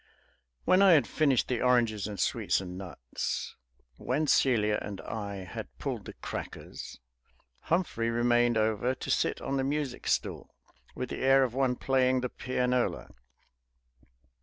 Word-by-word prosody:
When 185 Hz, +1 st, +5 dB
I 195 Hz, -3 st, +8 dB
had 150 Hz, -, +5 dB
finished 140 Hz, -6 st, +2 dB
the 125 Hz, -2 st, -1 dB
oranges 115 Hz, -5 st, +2 dB
and 105 Hz, -3 st, -6 dB
sweets -, -, +1 dB
and 90 Hz, -1 st, -7 dB
nuts, 85 Hz, -10 st, -5 dB, 0.4 s
when 145 Hz, +5 st, -1 dB
Celia 110 Hz, -7 st, +3 dB
and 100 Hz, -2 st, -6 dB
I 100 Hz, -3 st, -5 dB
had 90 Hz, -, -8 dB
pulled -, -, -4 dB
the -, -, -8 dB
crackers, -, -, -7 dB, 0.7 s
Humphrey 160 Hz, -10 st, 0 dB
remained 120 Hz, 0 st, +3 dB
over 110 Hz, +3 st, +1 dB
to -, -, -4 dB
sit -, -, +1 dB
on 135 Hz, 0 st, -2 dB
the 135 Hz, -, 0 dB
music 140 Hz, -2 st, -2 dB
stool, -, -, -1 dB, 0.4 s
with 125 Hz, -, -4 dB
the -, -, -5 dB
air 135 Hz, +1 st, +5 dB
of 125 Hz, -3 st, -1 dB
one 130 Hz, -1 st, +1 dB
playing 130 Hz, 0 st, +2 dB
the 125 Hz, -, -2 dB
pianola. 125 Hz, 0 st, -1 dB
125 Hz, 145 wpm, -29 LUFS, 110-135 Hz, 0.7 s, I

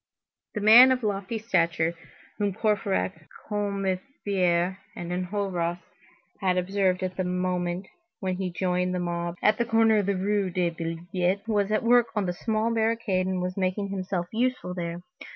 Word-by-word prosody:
The 210 Hz, -, -2 dB
man 235 Hz, +5 st, +9 dB
of 255 Hz, -2 st, 0 dB
lofty 200 Hz, +1 st, -2 dB
stature 170 Hz, -6 st, +1 dB, 0.5 s
whom 205 Hz, -2 st, 0 dB
Courfeyrac, 195 Hz, -, -1 dB, 0.2 s
Combeferre, 195 Hz, -3 st, -1 dB, 0.2 s
and 175 Hz, 0 st, -6 dB
Enjolras 180 Hz, -2 st, -2 dB, 0.6 s
had 185 Hz, -2 st, +1 dB
observed 185 Hz, 0 st, +1 dB
at 185 Hz, 0 st, -3 dB
the 185 Hz, -, 0 dB
moment 180 Hz, 0 st, -2 dB, 0.3 s
when 185 Hz, -2 st, -2 dB
he 190 Hz, -1 st, -2 dB
joined 180 Hz, 0 st, 0 dB
the -, -, -1 dB
mob 170 Hz, -1 st, -2 dB
at 215 Hz, +2 st, +4 dB
the 235 Hz, -, +2 dB
corner 225 Hz, -1 st, +4 dB
of 205 Hz, -2 st, +1 dB
the 200 Hz, -1 st, +1 dB
Rue 200 Hz, 0 st, 0 dB
des 175 Hz, -1 st, 0 dB
Billettes, 175 Hz, +4 st, -2 dB
was 205 Hz, -2 st, +1 dB
at 215 Hz, -, +1 dB
work 240 Hz, 0 st, +5 dB
on 210 Hz, -2 st, +1 dB
the 180 Hz, -, -1 dB
smaller 220 Hz, +4 st, -1 dB
barricade 220 Hz, -4 st, 0 dB
and 185 Hz, -1 st, -1 dB
was 180 Hz, 0 st, -3 dB
making 195 Hz, +1 st, -1 dB
himself 185 Hz, -2 st, -2 dB
useful 245 Hz, -5 st, -1 dB
there. 170 Hz, -1 st, -4 dB
190 Hz, 160 wpm, -26 LUFS, 180-210 Hz, 0.6 s, man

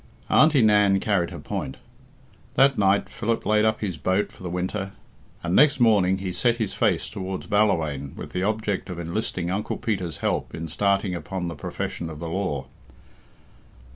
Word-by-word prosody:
Auntie 155 Hz, -5 st, +5 dB
Nan 105 Hz, -2 st, +5 dB
carried 95 Hz, -4 st, +1 dB
her -, -, -8 dB
point. 65 Hz, -, -5 dB, 0.8 s
That 135 Hz, 0 st, +5 dB
night 100 Hz, -2 st, +3 dB
Philip 115 Hz, 0 st, -2 dB
laid 105 Hz, 0 st, +3 dB
up 110 Hz, 0 st, +1 dB
his 95 Hz, -6 st, -3 dB
boat 95 Hz, +6 st, 0 dB
for -, -, -18 dB
the 90 Hz, -, -4 dB
winter, 95 Hz, +3 st, -3 dB, 0.5 s
and 85 Hz, +1 st, 0 dB
next 145 Hz, -1 st, +5 dB
morning 100 Hz, -6 st, +4 dB
he 95 Hz, -1 st, -4 dB
set 120 Hz, +3 st, +2 dB
his 110 Hz, -4 st, -2 dB
face -, -, +1 dB
towards 95 Hz, -1 st, -5 dB
Ballawhaine 80 Hz, -10 st, +1 dB
with -, -, -8 dB
the 90 Hz, -, -2 dB
object 105 Hz, -1 st, -1 dB
of 90 Hz, -, -5 dB
enlisting 85 Hz, 0 st, -2 dB
Uncle 100 Hz, +3 st, -2 dB
Peter's 95 Hz, -8 st, -2 dB
help -, -, -2 dB
in 80 Hz, 0 st, -5 dB
starting 100 Hz, +2 st, +1 dB
upon 90 Hz, +2 st, -4 dB
the 85 Hz, -, -6 dB
profession 80 Hz, +3 st, -4 dB
of 80 Hz, -, -8 dB
the 85 Hz, +2 st, -5 dB
law. 80 Hz, -7 st, -2 dB
95 Hz, 170 wpm, -25 LUFS, 85-105 Hz, 0.8 s, Auntie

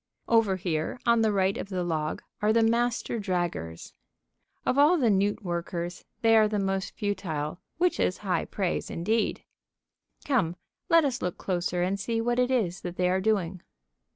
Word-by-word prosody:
Over 225 Hz, -4 st, +3 dB
here 170 Hz, +3 st, -2 dB
on 235 Hz, -1 st, +4 dB
the 220 Hz, -1 st, +3 dB
right 195 Hz, -1 st, +2 dB
of -, -, -5 dB
the 185 Hz, -2 st, -2 dB
log 155 Hz, -3 st, -2 dB, 0.2 s
are 210 Hz, +1 st, +3 dB
the 230 Hz, +1 st, +4 dB
Master 235 Hz, 0 st, +1 dB
Draggers. 175 Hz, -, -3 dB, 0.7 s
Of -, -, +2 dB
all 305 Hz, +5 st, +6 dB
the 240 Hz, -8 st, +3 dB
newt 205 Hz, +3 st, +1 dB
workers, 175 Hz, 0 st, -4 dB, 0.2 s
they 225 Hz, 0 st, +6 dB
are 215 Hz, -1 st, +6 dB
the 210 Hz, 0 st, -1 dB
most 195 Hz, -1 st, -1 dB
futile, 175 Hz, -6 st, -3 dB, 0.2 s
which 355 Hz, +1 st, +1 dB
is 180 Hz, -, +1 dB
high 185 Hz, -, 0 dB
praise 190 Hz, -3 st, -2 dB
indeed. 215 Hz, +7 st, -1 dB, 0.8 s
Come, 225 Hz, -, +1 dB, 0.3 s
let 330 Hz, -2 st, +6 dB
us 260 Hz, -3 st, -1 dB
look 180 Hz, -1 st, -2 dB
closer 180 Hz, -1 st, -1 dB
and 195 Hz, +2 st, -1 dB
see 225 Hz, +3 st, -1 dB
what 240 Hz, +2 st, 0 dB
it 250 Hz, 0 st, +3 dB
is 205 Hz, -9 st, 0 dB
that 175 Hz, -1 st, -5 dB
they 180 Hz, 0 st, +1 dB
are 190 Hz, +1 st, +1 dB
doing. 190 Hz, -4 st, 0 dB
195 Hz, 175 wpm, -27 LUFS, 175-225 Hz, 0.8 s, all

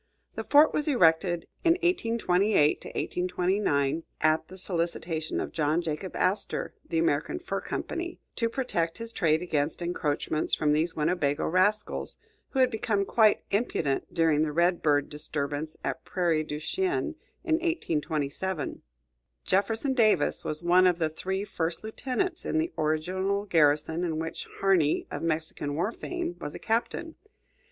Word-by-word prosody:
The -, -, -4 dB
fort 295 Hz, +2 st, +5 dB
was 300 Hz, -, 0 dB
erected 175 Hz, -, +3 dB, 0.2 s
in 335 Hz, -, +6 dB
1828 200 Hz, -, +1 dB
29 170 Hz, -5 st, +1 dB, 0.2 s
at 155 Hz, +1 st, +2 dB
the 185 Hz, -, -11 dB
solicitation 170 Hz, -3 st, -2 dB
of -, -, -3 dB
John 155 Hz, +1 st, +1 dB
Jacob 165 Hz, +4 st, -4 dB
Astor 185 Hz, +3 st, 0 dB, 0.2 s
(the 165 Hz, -, -1 dB
American 160 Hz, -, +1 dB
Fur 355 Hz, +1 st, -4 dB
Company), 345 Hz, 0 st, -4 dB, 0.2 s
to 230 Hz, -1 st, 0 dB
protect 175 Hz, -10 st, -1 dB
his 230 Hz, 0 st, -6 dB
trade 160 Hz, 0 st, +2 dB
against 150 Hz, -3 st, -1 dB
encroachments 155 Hz, -3 st, 0 dB
from 150 Hz, -1 st, +2 dB
these 160 Hz, +3 st, +1 dB
Winnebago 150 Hz, -2 st, 0 dB
rascals, 195 Hz, +5 st, +1 dB, 0.3 s
who -, -, -6 dB
had 255 Hz, -1 st, +4 dB
become 210 Hz, -2 st, 0 dB
quite 215 Hz, 0 st, +4 dB
impudent 180 Hz, -, 0 dB
during 160 Hz, -3 st, +3 dB
the 155 Hz, -1 st, +1 dB
Red 170 Hz, +3 st, +2 dB
Bird 145 Hz, -2 st, +2 dB
disturbance 150 Hz, 0 st, -3 dB
at 165 Hz, -, -3 dB
Prairie 170 Hz, -4 st, 0 dB
du 150 Hz, -1 st, -5 dB
Chien, 370 Hz, -, -1 dB, 0.3 s
in 320 Hz, -3 st, +2 dB
1827. 160 Hz, -, -2 dB, 0.6 s
Jefferson 220 Hz, +8 st, +1 dB
Davis 225 Hz, -4 st, +3 dB
was 155 Hz, +2 st, -4 dB
one 180 Hz, +2 st, +5 dB
of 180 Hz, -2 st, +2 dB
the 160 Hz, -2 st, 0 dB
three 190 Hz, +5 st, -3 dB
first 170 Hz, -4 st, -3 dB
lieutenants 265 Hz, +10 st, -2 dB
in -, -, -1 dB
the 330 Hz, +3 st, 0 dB
original 185 Hz, +6 st, 0 dB
garrison, 160 Hz, -1 st, +2 dB
in 165 Hz, -3 st, -1 dB
which 160 Hz, +1 st, -5 dB
Harney, 180 Hz, -6 st, +3 dB
of -, -, -4 dB
Mexican 155 Hz, -3 st, -2 dB
war 175 Hz, +8 st, 0 dB
fame, 350 Hz, +5 st, -4 dB
was 145 Hz, -, -6 dB
a -, -, -6 dB
captain. 240 Hz, +8 st, -1 dB
175 Hz, 145 wpm, -28 LUFS, 155-215 Hz, 0.6 s, in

